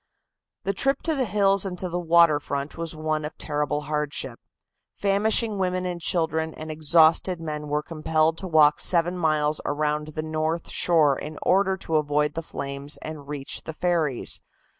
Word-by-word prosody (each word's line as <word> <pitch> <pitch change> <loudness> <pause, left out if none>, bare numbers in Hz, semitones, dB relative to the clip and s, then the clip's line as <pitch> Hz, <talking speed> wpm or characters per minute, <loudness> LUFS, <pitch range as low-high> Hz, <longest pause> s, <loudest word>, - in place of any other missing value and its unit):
The 195 - 0
trip 275 +7 +1
to 325 - 0
the 270 -4 0
hills 200 -1 +2
and 185 -2 -2
to 185 - -4
the 175 0 -3
water 170 -3 +4
front 140 0 -4
was 165 -1 -5
one 155 0 -2
of 150 - -6
terrible 150 0 -2
hardship. 150 0 -3 0.6
Famishing 205 +1 +2
women 185 -1 -1
and 175 -1 -4
children 160 -2 -1
and 155 0 -7
exhausted 160 +3 +4
men 150 -2 -5
were 150 +1 -1
compelled 160 0 0
to 190 - -5
walk 155 -3 +5
seven 175 0 +1
miles 155 -3 +1
around 150 +1 -1
the 155 - -2
north 155 +1 -2
shore 155 -5 +3
in 150 0 -7
order 190 0 +2
to 165 -4 -1
avoid 150 0 +1
the 165 - -3
flames 140 -1 -5
and 155 -3 -7
reach 145 -2 -5
the 160 - -5
ferries. 160 -6 0
160 Hz, 170 wpm, -25 LUFS, 150-180 Hz, 0.6 s, walk